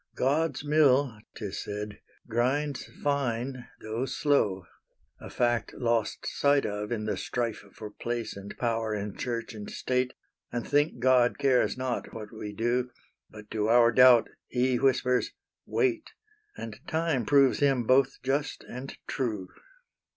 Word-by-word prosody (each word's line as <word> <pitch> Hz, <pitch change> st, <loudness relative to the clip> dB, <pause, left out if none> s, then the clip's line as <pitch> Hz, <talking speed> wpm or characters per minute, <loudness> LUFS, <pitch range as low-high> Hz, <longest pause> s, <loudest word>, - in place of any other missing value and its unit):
"God's 145 Hz, +1 st, 0 dB
mill," 140 Hz, -6 st, +3 dB, 0.2 s
'tis 105 Hz, -4 st, -5 dB
said, 105 Hz, 0 st, -6 dB, 0.3 s
"grinds 130 Hz, +5 st, 0 dB
fine, 130 Hz, -3 st, -1 dB
tho' 115 Hz, +4 st, -3 dB
slow," 105 Hz, -13 st, +1 dB, 0.5 s
A -, -, -9 dB
fact 120 Hz, -1 st, 0 dB
lost 115 Hz, -3 st, 0 dB
sight 140 Hz, 0 st, +2 dB
of 105 Hz, +1 st, -3 dB
in 110 Hz, -2 st, -2 dB
the 110 Hz, -, -1 dB
strife 115 Hz, -4 st, -3 dB
For 105 Hz, +1 st, -9 dB
place 120 Hz, +1 st, -4 dB
and 100 Hz, 0 st, -9 dB
power 115 Hz, -2 st, -1 dB
in 100 Hz, -1 st, -4 dB
Church 120 Hz, -1 st, -3 dB
and 105 Hz, -2 st, -7 dB
State, 125 Hz, 0 st, -1 dB, 0.4 s
And 120 Hz, -1 st, -3 dB
think 145 Hz, -1 st, +2 dB
God 125 Hz, 0 st, +4 dB
cares 135 Hz, -3 st, +2 dB
not 130 Hz, -2 st, -3 dB
what 110 Hz, 0 st, -8 dB
we 105 Hz, -1 st, -6 dB
do; 120 Hz, +4 st, 0 dB, 0.4 s
But 105 Hz, -1 st, -13 dB
to 110 Hz, -1 st, 0 dB
our 120 Hz, 0 st, +6 dB
doubt 125 Hz, -1 st, +7 dB, 0.2 s
he 125 Hz, 0 st, +1 dB
whispers 125 Hz, -2 st, +2 dB, 0.3 s
"wait," 345 Hz, -6 st, 0 dB, 0.5 s
And 110 Hz, -1 st, -7 dB
time 160 Hz, -5 st, 0 dB
proves 140 Hz, +1 st, +4 dB
Him 135 Hz, -4 st, +3 dB
both 130 Hz, +3 st, +3 dB
just 140 Hz, +3 st, -1 dB
and 130 Hz, +3 st, -7 dB
true. 110 Hz, -9 st, -3 dB
125 Hz, 140 wpm, -28 LUFS, 110-135 Hz, 0.5 s, doubt